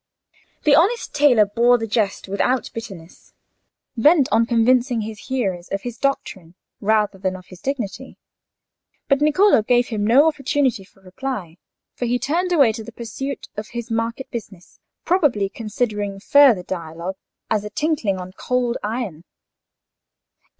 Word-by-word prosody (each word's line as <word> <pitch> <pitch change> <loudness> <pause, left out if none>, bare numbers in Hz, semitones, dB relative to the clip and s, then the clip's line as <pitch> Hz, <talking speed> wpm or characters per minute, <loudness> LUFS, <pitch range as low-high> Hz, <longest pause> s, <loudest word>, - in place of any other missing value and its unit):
The 300 - +4
honest 400 +11 +2
tailor 280 -7 +5
bore 235 +4 +3
the 225 - -3
jest 215 -3 -1
without 205 +6 0
bitterness, 190 -7 -10 0.6
bent 285 +3 +4
on 230 +1 +3
convincing 240 +1 +2
his 215 -1 -8
hearers 195 -10 -2
of 195 0 -4
his 240 -2 -6
doctrine 190 -11 -3 0.2
rather 210 -2 +1
than 185 0 -2
of 185 -1 -11
his 180 -1 -14
dignity. 265 -2 -4 0.9
But 275 -2 +3
Niccolò 305 - +4
gave 245 -1 +3
him 215 -3 -2
no 255 +9 +5
opportunity 275 -7 0
for 195 0 -24
replying; 185 -3 -6 0.4
for 245 - -4
he 245 +1 +1
turned 335 +9 -1
away 280 -9 +5
to 220 0 -7
the 235 - -10
pursuit 245 +5 -6
of 210 +1 -5
his 235 0 -5
market 230 +3 -3
business, 195 -6 -9 0.3
probably 285 - +2
considering 210 -3 -3
further 250 -3 +5
dialogue 170 +1 -6 0.3
as 215 -2 +1
a 210 - -6
tinkling 285 -9 -1
on 185 0 -7
cold 245 +4 -1
iron. 210 -7 -4
230 Hz, 145 wpm, -21 LUFS, 200-265 Hz, 0.9 s, tailor